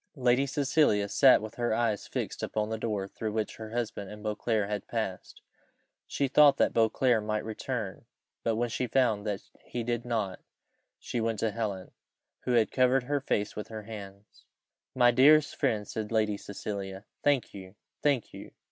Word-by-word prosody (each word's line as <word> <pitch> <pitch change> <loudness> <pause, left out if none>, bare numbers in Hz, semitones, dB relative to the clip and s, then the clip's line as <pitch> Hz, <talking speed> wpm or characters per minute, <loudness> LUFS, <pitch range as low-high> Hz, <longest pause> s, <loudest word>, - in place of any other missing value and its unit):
Lady 130 +1 +3
Cecilia 135 -7 +2
sat 130 +1 +5
with 110 +1 -6
her 120 -2 +1
eyes 110 -3 0
fixed - - -4
upon 105 0 -2
the 110 - -2
door 105 -4 -2
through 110 +2 -4
which 110 -1 -2
her 110 -1 -7
husband 115 -4 -3
and 105 0 -10
Beauclerc 105 0 0
had 105 -1 -4
passed. 110 -5 -4 0.6
She 140 - 0
thought 145 +1 +6
that - - +2
Beauclerc 115 0 +3
might 105 0 -2
return; 110 -2 -4 0.4
but 115 - 0
when 120 +2 0
she 125 +2 -2
found 110 -4 +1
that 100 -1 -2 0.2
he 120 - -4
did 120 0 -2
not, 110 -6 -2 0.6
she 120 - -3
went 115 -1 -1
to 110 - +1
Helen, 100 -4 -4 0.5
who 125 - +1
had 115 -2 +3
covered 130 0 +3
her 145 +2 -1
face 105 -5 -1
with 105 - -5
her 110 -1 -7
hands. 100 -2 -11 0.5
"My 120 -1 +6
dearest 145 +4 +5
friend," 105 -2 0
said 110 -1 -5
Lady 110 -2 +2
Cecilia, 100 -1 -6 0.2
"thank 145 -3 +1
you! 95 0 -10 0.3
thank 140 -6 +1
you! - - -10
110 Hz, 175 wpm, -29 LUFS, 105-125 Hz, 0.6 s, thought